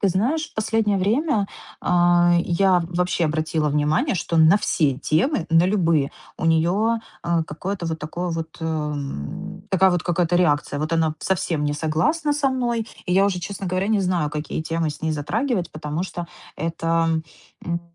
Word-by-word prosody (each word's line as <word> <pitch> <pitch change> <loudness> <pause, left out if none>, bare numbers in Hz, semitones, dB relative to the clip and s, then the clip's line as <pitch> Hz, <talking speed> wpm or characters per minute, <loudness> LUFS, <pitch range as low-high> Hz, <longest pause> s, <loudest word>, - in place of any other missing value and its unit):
Ты 200 - +3
знаешь, 265 - 0
в - - -31
последнее 220 -1 +1
время, 220 - +1 0.3
а, 175 0 +4
я 180 0 +3
вообще 180 -1 0
обратила 155 0 0
внимание, 150 - +1
что 170 -1 -2
на 160 +4 +6
все 155 -8 +1
темы, 170 - +1
на 165 +1 +5
любые 165 -8 +2 0.2
у - - -5
нее, 190 +8 +2 0.2
э, 170 -1 +1
какое-то 180 +4 -4
вот 160 0 -3
такое 170 +4 -4
вот, 165 0 -5
э, - - -4
м, 150 - -4
такая 190 0 +4
вот 175 -2 0
какая-то 175 0 +1
реакция. 145 -4 +1
Вот 155 +2 -2
она 160 -2 +2
совсем 170 -5 -1
не 145 - 0
согласна 165 - 0
со 285 -1 +1
мной. 240 -3 -1 0.2
И 180 - 0
я 195 +2 +5
уже, 185 -3 0
честно 195 +1 -5
говоря, 185 +3 -1
не 220 - +3
знаю, 175 -5 0
какие 150 +1 -4
темы 165 -1 -1
с 145 - -10
ней 160 - 0
затрагивать. 185 - -1
Потому 155 +3 -3
что 175 -2 -6 0.3
это, 165 0 0 0.6
м, 170 0 -2
175 Hz, 175 wpm, -23 LUFS, 160-195 Hz, 0.6 s, на